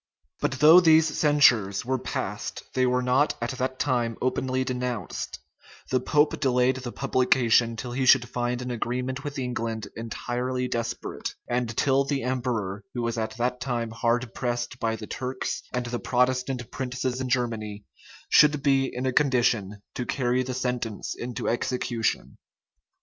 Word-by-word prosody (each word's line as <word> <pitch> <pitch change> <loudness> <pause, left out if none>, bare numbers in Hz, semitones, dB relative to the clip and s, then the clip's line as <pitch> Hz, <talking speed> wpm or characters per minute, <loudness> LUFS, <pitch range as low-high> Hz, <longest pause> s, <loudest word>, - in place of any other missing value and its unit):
[*] 70 - -48
But - - 0
though 155 +6 +8
these 160 -2 +5
censures 120 -10 +4
were 130 +1 0
passed, - - -4
they 130 -1 +2
were 125 0 +1
not 130 +4 +2
at 120 +2 -2
that 130 0 -3
time 120 -5 0
openly 130 0 0
denounced; 125 -2 -3 0.5
the 130 - +3
pope 150 +4 +2
delayed 130 -2 +2
the 125 -2 -6
publication 125 -3 +2
till 120 +2 -6
he 130 +1 -1
should 125 -2 +6
find 120 0 -2
an 125 - -4
agreement 125 +3 -3
with 145 0 -5
England 115 -5 -3
entirely 125 +2 -3
desperate; 115 -1 -4
and 120 -2 -2
till 135 0 +3
the 140 -1 -2
emperor, 115 -6 -2
who 120 - -2
was 115 0 -1
at 110 0 -3
that 125 +1 -1
time 120 -3 -2
hard 115 +1 0
pressed 120 0 -3
by 115 -1 0
the 110 -1 -8
Turks 130 +3 -4
and 125 -1 -2
the 120 0 -3
Protestant 125 -1 0
princes 130 -1 -3
in 130 - -3
Germany, 110 -5 -2 0.4
should 150 -2 +5
be 135 -2 +3
in 125 +1 -4
a 130 - 0
condition 115 -8 +1
to 125 - -4
carry 125 -1 +1
the 130 0 -3
sentence 125 -4 -3
into 120 0 -5
execution. 115 - -1
125 Hz, 160 wpm, -26 LUFS, 120-130 Hz, 0.5 s, though